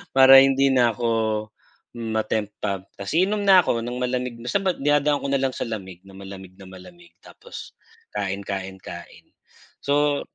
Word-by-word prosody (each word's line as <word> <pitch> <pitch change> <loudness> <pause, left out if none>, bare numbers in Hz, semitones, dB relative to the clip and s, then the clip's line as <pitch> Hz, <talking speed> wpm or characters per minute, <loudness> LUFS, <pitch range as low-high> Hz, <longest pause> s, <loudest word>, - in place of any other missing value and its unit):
para 135 0 +9
hindi 135 0 +3
na 120 -2 +4
ako 120 +3 -5 0.9
ma-tempt 110 -2 -2
pa. 100 -3 -2 0.2
Tapos 100 +5 -6
iinom 205 +3 +1
na 190 -2 +7
ako 115 -7 -1
ng 120 +1 -5
malamig. 125 -1 -2
Basta 125 +11 -1 0.2
dinadaan 145 0 +1
ko 140 - -3
na 140 -1 +1
lang 135 -1 0
sa - - -4
lamig, 95 -5 -7
na 95 - -15
malamig 95 -1 -10
na 95 - -13
malamig, 170 - -15
tapos 485 - -12 0.4
kain 100 +1 -3
kain 95 -1 -5
kain. - - -11 0.6
So 145 0 +1
125 Hz, 160 wpm, -23 LUFS, 100-140 Hz, 0.9 s, para